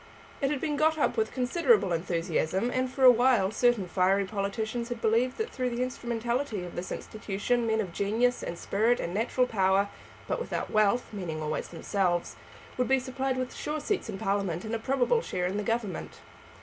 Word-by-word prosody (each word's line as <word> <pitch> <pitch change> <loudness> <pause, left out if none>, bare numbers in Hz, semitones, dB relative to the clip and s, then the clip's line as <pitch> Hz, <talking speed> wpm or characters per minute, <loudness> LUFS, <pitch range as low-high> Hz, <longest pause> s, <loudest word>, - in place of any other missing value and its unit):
It 275 - +2
had 295 -1 -1
been 295 -1 -1
got 315 +1 +3
up 295 - +1
with 445 -1 0
considerable 270 - +2
enthusiasm, 170 +5 0
and 255 0 -1
for 265 - -2
a 255 - +11
while 240 -5 +3
certain 240 -5 +2
fiery 195 +2 +2
politicians 220 +4 -3
had 240 -1 -4
believed 235 +4 +1
that 445 +1 -3
through 255 -1 -1
the 240 +1 -1
instrumentality 235 -2 -2
of 175 - -8
this 175 - -5
institution 220 +3 -2
men 220 0 +1
of 190 -6 -3
genius, 225 +6 +1
and 170 - -5
spirit, 225 +7 +1
and 170 - -3
natural 235 +4 +1
power, 195 -3 +2 0.4
but - - -1
without 480 - -3
wealth, 215 +3 +3
meaning 175 -6 -4
always 155 0 -3
themselves, 175 0 -1 0.4
would 250 - +2
be 265 - +4
supplied 260 0 -2
with 255 -1 -3
sure 305 +1 -3
seats 405 +6 -2
in - - -4
Parliament 195 -4 -1
and 220 - -4
a 230 - 0
probable 270 - +2
share 180 - -2
in 185 +3 -1
the - - 0
Government. 220 -4 -3
225 Hz, 190 wpm, -28 LUFS, 195-255 Hz, 0.4 s, a